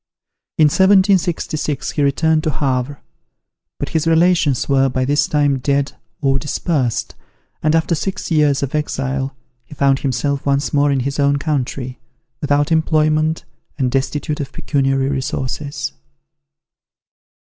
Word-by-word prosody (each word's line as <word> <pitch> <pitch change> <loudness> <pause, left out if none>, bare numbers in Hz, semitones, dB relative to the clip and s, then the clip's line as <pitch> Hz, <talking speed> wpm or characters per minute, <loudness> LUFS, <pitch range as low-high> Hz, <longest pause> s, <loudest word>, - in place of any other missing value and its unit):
In 155 - +6
1766, 185 -4 +2
he 150 - -2
returned 155 +3 +2
to - - +2
Havre; 135 -1 -2 0.8
but - - -4
his 160 0 -1
relations 165 -6 +3
were 135 -1 +3
by 130 0 -1
this 145 +2 +2
time 145 -2 +1
dead 140 +1 0 0.3
or 135 -1 +2
dispersed, 140 -3 -1 0.5
and 155 +1 +2
after 165 +1 +1
six 185 +3 -3
years 150 -3 +3
of 135 - -3
exile, 135 -2 -2 0.3
he 135 - -13
found 140 -1 +2
himself 140 +1 -1
once 140 0 0
more 145 0 +3
in 135 -2 +1
his 140 +3 -3
own 140 0 +3
country, 135 -4 -3 0.4
without 145 +1 +1
employment 155 0 +1 0.3
and 130 -3 0
destitute 145 +3 -2
of 140 -2 -4
pecuniary 135 -2 0
resources. 135 - -3
145 Hz, 130 wpm, -18 LUFS, 135-155 Hz, 0.8 s, In